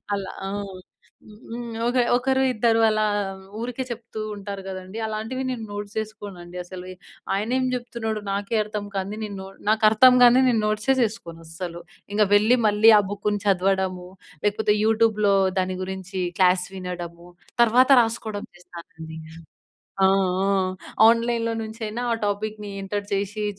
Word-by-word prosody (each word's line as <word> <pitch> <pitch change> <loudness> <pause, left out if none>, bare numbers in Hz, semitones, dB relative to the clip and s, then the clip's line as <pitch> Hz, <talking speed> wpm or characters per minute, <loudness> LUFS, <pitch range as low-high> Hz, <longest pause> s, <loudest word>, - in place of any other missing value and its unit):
అలా 195 -1 -5 0.2
ఆ! - - -4 1.0
హ్మ్. 235 -1 -6
ఒక 250 +1 0 0.2
ఒకరు, 265 +1 +1
ఇద్దరు 225 0 +2
అలా 215 0 +2 0.6
ఊరికే 245 +2 -3
చెప్తూ 225 -2 -6
ఉంటారు 200 -1 -6
గదండీ. 185 +2 -7
అలాంటివి 220 +5 -4
నేను 240 -3 -4
నోట్స్ 205 0 -6
జేసుకోనండి 195 -5 -6
అసలు. 180 0 -9 0.5
ఆయనేం 250 +6 0
జెప్తున్నాడు 235 -3 -3
నాకే 200 +3 -2
అర్థం 210 -1 -5
కానిది 195 +2 -3
నేను 205 -2 -5
నొ 190 - -8 0.2
నాకర్థం 220 +3 +6
గానిది 250 +2 +7
నేను 225 -3 +2
నోట్సే 215 +5 +1
జేసుకోను 170 -7 -3
అసలు. 170 +1 -6 0.3
ఇంగ 210 0 +4
వెళ్లి, 220 +4 +5
మళ్ళీ 210 +2 +5
ఆ - - +6
బుక్‌ని 205 0 -1
చదవడము, 190 -1 +1 0.4
లేకపోతే 210 0 +2
యూట్యూబ్‌లో 220 -2 +3 0.3
దాని 185 0 -1
గురించి 190 0 -5 0.2
క్లాస్ 180 -1 +4
వినడము, 175 -2 -7 0.4
తర్వాత 250 +3 +4
రాసుకోవడం 220 -2 -3
చేస్తానండి. 165 -2 -11 0.9
ఆ! - - +7 0.4
ఆ! - - +2 0.6
ఆన్‌లైన్‌లో 230 0 +1
నుంచైనా 220 +1 -5
ఆ - - +1
టాపిక్‌ని 210 0 -4
ఎంటర్ 200 +1 -3
చేసి, 205 +2 -2
210 Hz, 130 wpm, -24 LUFS, 190-225 Hz, 1.0 s, గానిది